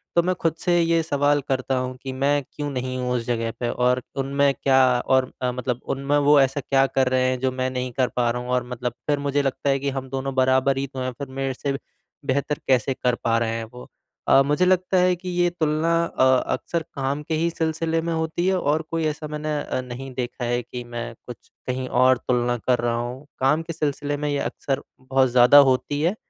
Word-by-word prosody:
तो 170 - +6
मैं 185 +1 +1
खुद 165 -1 -1
से 175 -1 +2
ये 165 0 +2
सवाल 145 -1 +2
करता 130 0 0
हूँ 130 0 -4
कि 135 - -4
मैं 140 +2 +1
क्यों 145 -1 -4
नहीं 130 -1 -3
हूँ 125 -1 -2
उस 115 - -2
जगह 115 -1 -1
पे? 120 - -1
और 125 +1 +1
उनमें 140 +1 +1
क्या 135 -1 +2 0.3
और 130 -1 +2
अ, 125 -1 0
मतलब 125 -1 -3
उनमें 140 +2 0
वो 145 0 +5
ऐसा 135 +2 +1
क्या 135 +1 +3
कर 130 -1 +1
रहे 130 0 +2
हैं, 130 -1 -1
जो 130 0 0
मैं 130 0 -2
नहीं 125 0 -3
कर 130 -2 +3
पा 120 -1 +2
रहा 125 - -3
हूँ 125 - -8
और 125 0 +1
मतलब 125 -1 -3
फिर 145 -1 +1
मुझे 140 0 0
लगता 140 0 -1
है 135 0 +2
कि 140 +1 -1
हम 135 -1 -5
दोनों 135 0 -3
बराबर 130 +1 +3
ही 135 0 -1
तो 130 0 -8
हैँ, 130 0 -2
फिर 140 +2 -7
मेरे 135 0 -3
से 140 +2 -3
बे 135 - -3 0.5
बेहतर 140 +2 -1
कैसे 130 0 +2
कर 125 -1 0
पा 115 0 +2
रहे 115 -1 0
हैं 115 - -3
वो। 125 - -10 0.4
अ, 135 - +6
मुझे 150 +6 +2
लगता 185 0 +2
है 180 0 +3
कि 180 +1 -7
ये 175 0 +2
तुलना 160 -1 0
अ, 130 - +1 0.3
अक्सर 170 -1 -2
काम 140 +2 -2
के 160 - -4
ही 165 +2 +1
सिलसिले 160 0 -1
में 170 0 -2
होती 160 +2 -1
है 190 0 +2
और 150 +1 +1
कोई 165 -1 0
ऐसा 150 0 -3
मैंने 150 0 -3
अ, 130 - -3
नहीं 130 +1 -8
देखा 125 0 -4
है 120 +1 0
कि 120 +1 -7
मैं 120 -1 -6
कुछ 120 - -11 0.2
कहीं 130 0 -2
और 130 +1 +4
तुलना 120 0 +1
कर 125 -1 +3
रहा 120 0 0
हूँ, 125 +4 -5
काम 145 +5 +3
के 165 0 -6
सिलसिले 145 -1 -2
में 150 0 -2
ये 145 - 0
अक्सर 135 -1 -2 0.2
बहुत 130 0 +2
ज़्यादा 125 +3 +6
होती 145 +3 -1
है। 175 +6 +1
135 Hz, 235 wpm, -23 LUFS, 125-150 Hz, 0.5 s, तो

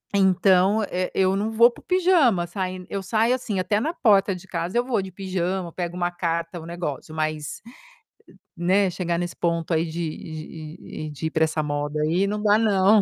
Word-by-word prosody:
então 190 +2 +4
e 180 0 -1
eu 190 0 +3
não 205 +3 -1
vou 235 +2 +6
para - - -16
o - - -37
pijama 340 - +3
sain 185 0 -4
eu 195 - -3
saio, 225 +4 +2
assim, 215 -6 -3
até 195 +3 +1
na 310 +9 -1
porta 200 - +3
de 180 +1 -11
casa 175 +4 -2
eu 240 - +2
vou 235 -6 0
de 190 - -7
pijama, 185 -1 -3
pego 175 -1 -4
uma 175 0 0
carta, 170 0 -2
um 160 - -10
negócio 160 -3 -5
mas, 155 -1 -3 1.0
né, 190 +3 +3
chegar 175 -1 -2
nesse 175 0 -3
ponto 170 0 -1
aí 160 +1 +2
de 165 -1 -4
de 155 0 -8 0.3
e - - -7
de 150 +2 -6
ir 160 - -5
para 160 0 +3
essa 155 0 -2
moda 145 +1 -2
aí, 170 +6 +2
não 210 +1 -2
dá 210 0 +5
não. 205 -1 +4
185 Hz, 205 wpm, -24 LUFS, 165-200 Hz, 1.0 s, vou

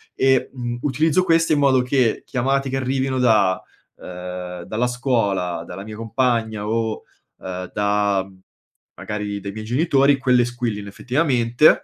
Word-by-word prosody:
e, 135 -1 +2
mhmm, 120 -2 -4
utilizzo 155 +5 +2
queste 165 -1 +3
in 150 - +2
modo 135 -2 +4
che 125 -2 +1
chiamate 135 +1 0
che 135 - -1
arrivino 130 0 -1
da 110 -6 +3 0.4
uhm, 90 0 -7
dalla 115 +6 -1
scuola, 100 -9 -1
dalla 95 +2 -7
mia 105 0 -9
compagna 115 -2 -1
o, 110 0 -1 0.3
uhm, 90 0 -6
da 100 -1 +1 0.7
magari 105 -1 -4
dai 100 0 -5
miei 110 +1 -7
genitori, 140 +2 +3
quelle 125 -2 +3
squillino 120 -4 -4
effettivamente, 125 +3 +2
120 Hz, 135 wpm, -21 LUFS, 105-130 Hz, 0.7 s, modo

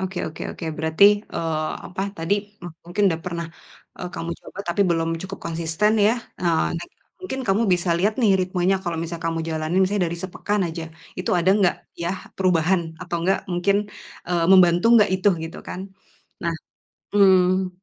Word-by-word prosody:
Oke 190 -1 -3
oke 155 - -9
oke, - - -8
berarti, 160 +4 +3 0.3
eee, 155 -1 -1 0.2
apa 190 - -4
tadi, 165 +4 0 0.3
m 175 - -4 0.2
mungkin 175 +4 0
udah 165 - 0
pernah, 170 -2 -4 0.5
eee, 180 - -4
kamu 165 +1 -4
coba - - -13
tapi 170 +4 +2
belum 165 -1 +1
cukup 190 +1 -7
konsisten, 165 +5 0
ya. 225 - +4 0.6
Next 170 - -8
time - - -38 0.2
mungkin 270 -8 -4
kamu 195 +4 +3
bisa 175 0 +1
lihat, 205 +5 +2
nih, 215 -5 +4
ritmenya, 185 +1 +1
kalau 170 -2 -2
misal 170 +1 -4
kamu 165 0 -1
jalanin 160 +3 0
misalnya 190 0 +1
dari 170 +1 -5
sepekan 200 +3 -2
aja, 165 0 -5 0.3
itu 180 - -2
ada 175 0 +2
nggak, 190 -4 +3 0.3
ya, 170 +2 0 0.2
perubahan. 180 -1 +2 0.2
Atau 180 -1 -3
nggak, 190 +1 0
mungkin, 180 +3 +2 0.5
eee, 175 -2 +1
membantu 175 0 +6
nggak 210 - +4
itu, 190 +2 +2 0.2
gitu, 165 - -8
kan. 185 - -6 0.6
Nah, 170 - +1 0.6
mmm, 185 -2 +4
180 Hz, 170 wpm, -23 LUFS, 170-190 Hz, 0.6 s, membantu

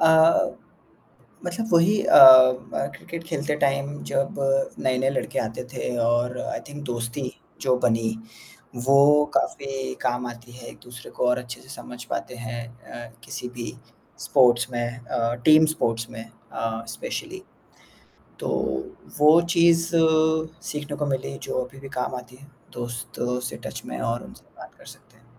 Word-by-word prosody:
अ, 160 0 +5 1.0
मतलब 200 +6 -3
वही 175 +5 +4
अ, - - +6 0.5
म 140 - -1
क्रिकेट 170 0 -8
खेलते 150 -3 -2
टाइम 140 +1 -1
जब 135 0 0 0.4
नए-नए 130 +1 +1
लड़के 135 - -2
आते 115 +3 -3
थे 125 -1 -3
और 120 +1 0
आई - - -4
थिंक 145 0 -8
दोस्ती 120 +1 -4 0.3
जो 130 -1 +2
बनी, 115 -2 +1 0.7
वो 140 +2 +6
काफ़ी 135 -1 -2
काम 125 0 -1
आती 120 0 -10
है 120 -1 -11
एक-दूसरे 125 0 -12
को - - +2
और 125 - +2
अच्छे-से 125 +1 -9
समझ 125 -2 -9
पाते - - -4
हैं 120 0 -6 0.3
अ, 120 -1 -8
किसी 125 - -6
भी 120 -1 -5 0.5
स्पोर्ट्स 125 -3 +3
में 120 0 -3
अ, 115 -1 -1
टीम 155 0 +7
स्पोर्ट्स 115 -4 -2
में 115 0 -8 0.3
अ, 115 0 -3
स्पेशली। - - -6 1.0
तो - - -4 0.7
वो 155 +3 +7
चीज़ 170 0 +4 0.7
सीखने 150 -3 -5
को 145 -1 -2
मिली 130 - -3
जो - - -3
अभी 130 +2 -14
भी 135 - -9
काम 125 - -2
आती 125 0 -10
है, 140 +2 -16 0.3
दोस्तों 120 +1 -4
से - - -7
टच - - -7
में 60 - -6
और 115 +1 -2
उनसे - - -14
बात - - -12
कर - - -17
सकते - - -15
हैं। - - -27
125 Hz, 150 wpm, -24 LUFS, 120-145 Hz, 1.0 s, टीम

